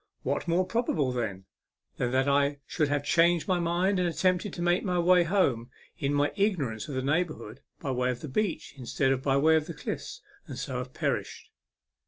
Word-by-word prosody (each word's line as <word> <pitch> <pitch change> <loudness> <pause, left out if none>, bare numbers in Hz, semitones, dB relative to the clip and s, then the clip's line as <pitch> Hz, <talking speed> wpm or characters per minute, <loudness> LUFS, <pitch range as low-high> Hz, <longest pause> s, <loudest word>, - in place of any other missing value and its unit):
What - - -2
more 175 +2 +2
probable, 180 - 0
then, 105 -6 -3 0.5
than 125 - 0
that 130 +2 +1
I 140 +1 +2
should 155 -3 0
have 145 0 0
changed 170 +2 +3
my 185 -2 +2
mind, 175 +3 +1
have 180 - +2
attempted 185 +3 +1
to 175 - -5
make 175 +1 +2
my 180 -3 0
way 180 +1 +5
home 155 - +1 0.3
in 140 - -1
my 145 0 +1
ignorance 165 - 0
of 145 - -5
the 130 - -1
neighbourhood, 145 -5 -2 0.2
by 135 - -3
way 125 0 0
of 125 -1 -3
the - - -6
beach, 195 +7 -2
instead 135 +1 0
of 130 -1 0
by 135 0 +2
way 160 +3 +5
of 155 -1 +1
the - - -6
cliffs, - - -6 0.2
and - - -7
so 130 -2 -3
have 125 +1 -7
perished - - -3
145 Hz, 205 wpm, -28 LUFS, 130-175 Hz, 0.5 s, way